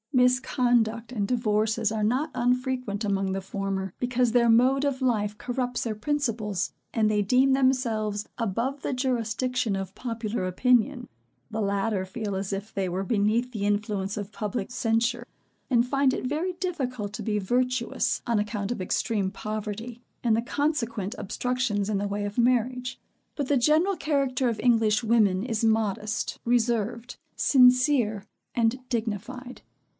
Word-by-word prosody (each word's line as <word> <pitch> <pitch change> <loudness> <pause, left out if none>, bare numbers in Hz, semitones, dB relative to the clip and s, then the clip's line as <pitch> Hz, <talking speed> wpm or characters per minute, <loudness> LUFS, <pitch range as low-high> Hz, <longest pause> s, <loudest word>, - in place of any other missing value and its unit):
Misconduct 245 -2 +2
and 205 -5 -1
divorces 220 -2 +1
are 220 -1 -1
not 260 +8 +1
unfrequent 250 -3 0
among 195 -1 0
the 195 0 -2
former, 195 -1 -3
because 250 -1 +1
their 235 0 +4
mode 255 +4 +4
of 280 -2 -1
life 210 -5 0
corrupts 250 +1 -2
their 225 -2 -2
principles, 220 -5 -1 0.2
and 220 -2 +2
they 210 -1 +2
deem 255 +6 +4
themselves 230 -6 +1
above 235 +5 -2
the - - -2
jurisdiction 250 -2 0
of 195 0 -5
popular 225 -4 -3
opinion; 245 +6 +2 0.4
the 220 0 -2
latter 200 0 0
feel 200 +1 -4
as 195 +1 -3
if 200 +2 -5
they 195 -2 -1
were 185 +2 -2
beneath 225 +4 +1
the 210 -4 -3
influence 205 -1 -1
of 205 0 -5
public 215 -1 -4
censure, 240 +1 0 0.4
and 240 -2 +3
find 275 0 +2
it - - -4
very 315 +8 -1
difficult 260 - -3
to - - -5
be 210 -2 0
virtuous, 250 +4 0
on 235 -2 +2
account 210 0 -2
of 240 - -3
extreme 195 +1 0
poverty, 215 +3 -5 0.2
and 230 -3 +3
the 225 - +1
consequent 235 -6 -1
obstructions 235 -2 -1
in 210 - +1
the 205 - -1
way 205 +1 -2
of 205 +2 -5
marriage. 250 +1 +1 0.4
But 285 -3 -2
the 285 - +3
general 310 +10 +3
character 275 -5 0
of 225 - -3
English 225 -2 +3
women 210 -4 +3
is 230 -2 -2
modest, 220 0 0
reserved, 235 0 0 0.2
sincere, 250 -5 +4 0.3
and 235 +2 +2
dignified. 240 +2 -4
230 Hz, 150 wpm, -26 LUFS, 210-250 Hz, 0.4 s, their